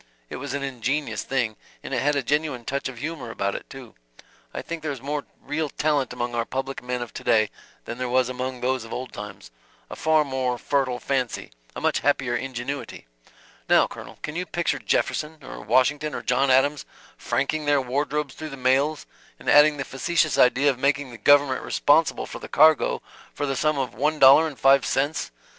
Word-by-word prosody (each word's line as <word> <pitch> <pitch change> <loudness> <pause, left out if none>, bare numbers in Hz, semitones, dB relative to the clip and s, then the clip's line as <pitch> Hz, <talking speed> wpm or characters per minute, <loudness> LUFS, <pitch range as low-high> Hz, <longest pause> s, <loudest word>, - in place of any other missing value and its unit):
It - - -5
was 140 +1 -5
an 140 - -3
ingenious 135 +2 -2
thing 115 -5 -1 0.3
and - - -6
it - - 0
had 145 +1 +2
a 140 - 0
genuine 145 -3 -1
touch 140 0 -2
of 130 - -10
humor 145 -2 -5
about 100 -3 -2
it, - - -7
too. 135 -4 -11 0.6
I - - -6
think 165 -1 -6
there 155 -1 -3
is 135 - -6
more 145 +3 -4
real 150 +1 -3
talent 145 -3 0
among 120 0 -3
our 120 -1 0
public 135 +3 -4
men 125 0 -3
of 120 - -11
to - - -8
day 110 -3 +3 0.3
than 120 - -6
there 125 -1 -2
was 130 0 +2
among 130 0 -4
those 130 -1 0
of 115 - -11
old 130 0 -6
times 95 -12 -9 0.4
a - - -5
far 155 -1 +2
more 130 -2 -1
fertile 130 -1 0
fancy, 130 - -2 0.2
a - - -5
much - - +1
happier 130 -4 +1
ingenuity. 135 +2 -5 0.6
Now, - - +6
Colonel, - - -10
can 150 - -5
you 180 +1 -3
picture 170 0 -1
Jefferson, 155 +1 -1
or - - -9
Washington 140 +7 +1
or - - -5
John 135 0 +2
Adams 135 +3 +3 0.3
franking 140 +5 -1
their 145 -1 +3
wardrobes 140 +2 -2
through 155 0 -7
the 135 - -8
mails 135 +4 +1 0.3
and - - -15
adding 150 0 +6
the 135 - -3
facetious 155 +3 0
idea 135 +3 +4
of 130 - -8
making 140 -1 0
the 120 - -11
government 145 -2 +4
responsible 155 +2 +2
for - - -8
the - - -9
cargo 155 0 +4 0.3
for 145 - -2
the 135 -1 -2
sum 155 +2 +1
of 130 -2 -2
one 150 +3 0
dollar 140 +3 +7
and 145 -4 -8
five 135 0 +5
cents? 145 +3 -1
135 Hz, 200 wpm, -24 LUFS, 125-145 Hz, 0.6 s, dollar